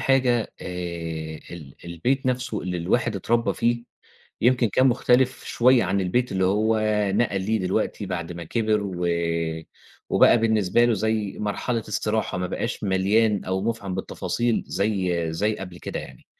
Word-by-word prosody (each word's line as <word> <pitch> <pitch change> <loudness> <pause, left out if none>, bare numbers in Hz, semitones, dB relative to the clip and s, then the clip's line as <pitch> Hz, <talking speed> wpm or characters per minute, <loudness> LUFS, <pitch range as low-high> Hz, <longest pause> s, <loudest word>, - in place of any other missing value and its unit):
حاجة 125 -4 +2
آآ، - - -7 0.8
ال 75 -6 -10
البيت 105 - -1
نَفْسه 125 -4 -1
اللي 90 -1 -3
الواحد 100 +6 0
اتربّى 115 +4 +1
فيه، 120 0 0 0.6
يمكن 125 0 +3
كان 130 +6 +3
مختلِف 130 +1 +2
شوية 125 0 +4
عن 100 - 0
البيت 120 +7 0
اللي 95 -1 +1
هو 110 +3 +2 0.3
نقَل 100 -3 +1
ليه 110 +3 0
دلوقتي 100 +2 -1
بعد 90 -2 -4
ما 85 -1 -7
كبِر 110 +2 +1
و 90 -3 -3 1.0
وبقى - - +6
بالنسبة 110 0 +3
له 120 - +3
زي 110 0 -1
مرحلة 105 +3 -1
استراحة، 105 -2 -1
ما 90 - -1
بقاش 90 - -3
مليان 100 +2 +2
أو 95 +1 -1
مُفعم 105 -4 -2
بالتفاصيل 100 +5 -1
زي 90 -5 -1
زي 105 +6 0
قبل 90 -2 -8
كده - - -5
يعني، 65 - -12
105 Hz, 150 wpm, -24 LUFS, 95-120 Hz, 1.0 s, وبقى